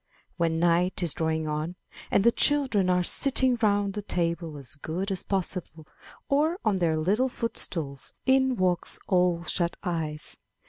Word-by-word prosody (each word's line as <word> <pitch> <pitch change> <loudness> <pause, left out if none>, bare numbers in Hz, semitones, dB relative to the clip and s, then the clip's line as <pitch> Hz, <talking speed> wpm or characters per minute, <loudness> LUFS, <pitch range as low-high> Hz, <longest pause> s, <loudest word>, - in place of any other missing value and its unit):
When 165 -2 +1
night 175 +2 +2
is 170 - +1
drawing 160 -1 -1
on, 155 +3 -3 0.3
and 195 - +3
the 235 - +6
children 260 -10 +2
are 180 0 +3
sitting 260 +5 +3
round 205 -2 +2
the 210 - -4
table 170 -4 -2
as 135 -3 -8
good 170 +7 -4
as 190 - -2
possible 180 -4 -4 0.4
or 305 +5 +2
on 210 -3 +2
their 165 -3 +1
little 205 +11 +1
footstools, 155 - -3
in 265 -1 +3
walks 180 -4 0
Ole 180 -2 +2
Shut 170 +1 -1
eyes. 160 -4 -4
180 Hz, 150 wpm, -27 LUFS, 160-205 Hz, 0.4 s, the